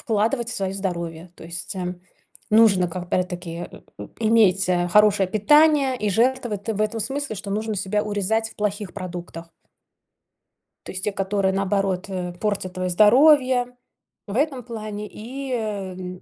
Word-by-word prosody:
вкладывать 225 Hz, +2 st, 0 dB
в -, -, -4 dB
свое 190 Hz, -1 st, -2 dB
здоровье. 170 Hz, -3 st, -4 dB
То -, -, -12 dB
есть, 170 Hz, +3 st, -6 dB
эм, 180 Hz, -1 st, -4 dB, 0.5 s
нужно, 210 Hz, -5 st, +5 dB
как, 175 Hz, +1 st, -5 dB
опять-таки, 175 Hz, -1 st, -3 dB
э, -, -, -13 dB, 0.2 s
э, 105 Hz, -, -8 dB
иметь, 210 Hz, -4 st, +3 dB
э, 175 Hz, -1 st, +1 dB
хорошее 205 Hz, 0 st, +4 dB
питание 280 Hz, +5 st, +4 dB
и 210 Hz, -3 st, -1 dB
жертвовать 235 Hz, -1 st, 0 dB
ты 225 Hz, -, -2 dB
в 210 Hz, -, -4 dB
этом 215 Hz, +1 st, 0 dB
смысле, 270 Hz, +2 st, -3 dB
что 200 Hz, +1 st, -7 dB
нужно 215 Hz, +1 st, -2 dB
себя 205 Hz, +2 st, -1 dB
урезать 215 Hz, +2 st, -1 dB
в -, -, -18 dB
плохих 205 Hz, -2 st, -2 dB
продуктах. 175 Hz, -3 st, -7 dB, 1.4 s
То -, -, -6 dB
есть 185 Hz, 0 st, -6 dB
те, 210 Hz, -, 0 dB
которые, 195 Hz, 0 st, 0 dB
наоборот, 195 Hz, -1 st, 0 dB
э, 180 Hz, -2 st, -4 dB
портят 190 Hz, 0 st, -3 dB
твое 185 Hz, 0 st, -2 dB
здоровье- 250 Hz, -, +5 dB, 0.5 s
в 200 Hz, -, -5 dB
этом 270 Hz, -1 st, 0 dB
плане, 215 Hz, -3 st, -6 dB
и 260 Hz, +6 st, -7 dB
эм. 185 Hz, -5 st, -4 dB
205 Hz, 160 wpm, -23 LUFS, 185-225 Hz, 1.4 s, нужно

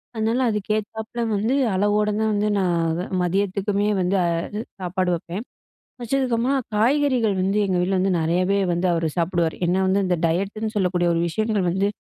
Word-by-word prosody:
அதனால 225 Hz, +3 st, 0 dB
அதுக்கு 210 Hz, -1 st, -3 dB
ஏத்தாப்பல 220 Hz, +2 st, -5 dB, 0.2 s
வந்து, 225 Hz, +7 st, 0 dB, 0.2 s
அளவோட 205 Hz, +2 st, +2 dB
தான் 220 Hz, 0 st, +1 dB
வந்து, 205 Hz, +1 st, +1 dB
நான் 170 Hz, -2 st, 0 dB, 0.2 s
மதியத்துக்குமே 200 Hz, +3 st, 0 dB
வந்து 180 Hz, +2 st, +1 dB
அது 170 Hz, +5 st, -2 dB, 0.2 s
சாப்பாடு 185 Hz, 0 st, -1 dB
வைப்பேன். 175 Hz, +6 st, -6 dB, 0.6 s
வச்சதுக்கப்பறமா 250 Hz, +1 st, 0 dB, 0.2 s
காய்கறிகள் 250 Hz, -2 st, +2 dB
வந்து, 195 Hz, +2 st, 0 dB
எங்க 185 Hz, -1 st, 0 dB
வீட்ல 185 Hz, +1 st, +1 dB
வந்து 190 Hz, 0 st, +1 dB
நிறையவே 180 Hz, +5 st, +1 dB
வந்து 175 Hz, +2 st, 0 dB
அவர் 165 Hz, -1 st, 0 dB
சாப்பிடுவாரு. 170 Hz, -1 st, 0 dB
ஏன்னா 185 Hz, +2 st, +1 dB
வந்து, 195 Hz, +1 st, +2 dB
இந்த 180 Hz, -1 st, +1 dB
டயட்டு 195 Hz, +6 st, -2 dB
ன்னு 220 Hz, 0 st, -2 dB
சொல்லக்கூடிய 180 Hz, -2 st, +1 dB
ஒரு 165 Hz, -, +1 dB
விஷயங்கள் 215 Hz, 0 st, 0 dB
வந்து, 195 Hz, +3 st, +1 dB
195 Hz, 160 wpm, -23 LUFS, 180-215 Hz, 0.6 s, அளவோட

